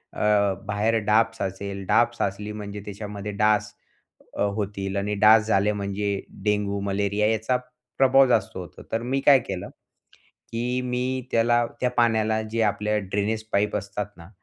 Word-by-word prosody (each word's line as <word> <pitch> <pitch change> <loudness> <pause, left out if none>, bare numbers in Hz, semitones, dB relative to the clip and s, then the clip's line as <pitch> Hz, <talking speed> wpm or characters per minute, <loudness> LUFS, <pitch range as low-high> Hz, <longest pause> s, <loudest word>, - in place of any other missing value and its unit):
अ, 105 -2 +2
बाहेर 105 +2 0
डाब 110 +1 +3
साचेल, 100 -1 -5
डाब 120 0 +4
साचली 100 +2 -2
म्हणजे 105 -1 -6
त्याच्यामध्ये 105 0 -6
डास 105 0 +2 0.6
अ, - - -2
होतील 100 -2 -3
आणि 100 +1 -1
डास 110 0 +7
झाले 105 -1 +3
म्हणजे 100 0 -2 0.2
डेंगू, 105 -1 0
मलेरिया 100 +1 0
याचा 110 +3 0 0.4
प्रभाव 135 0 +6
जास्त 110 -6 +1
होतो, 90 -2 -9
तर 115 - 0
मी 130 +3 -1
काय 140 -2 +8
केलं, 95 -6 -6 0.8
की 125 +2 -1
मी 125 +1 -2
त्याला 120 +1 +3 0.2
त्या 125 - +2
पाण्याला 110 -2 +2
जे 115 0 0
आपल्या 105 0 0
ड्रेनेज 105 +3 -2
पाईप 105 +1 +1
असतात 100 0 -3
ना, 85 +2 -13
105 Hz, 150 wpm, -25 LUFS, 100-115 Hz, 0.8 s, काय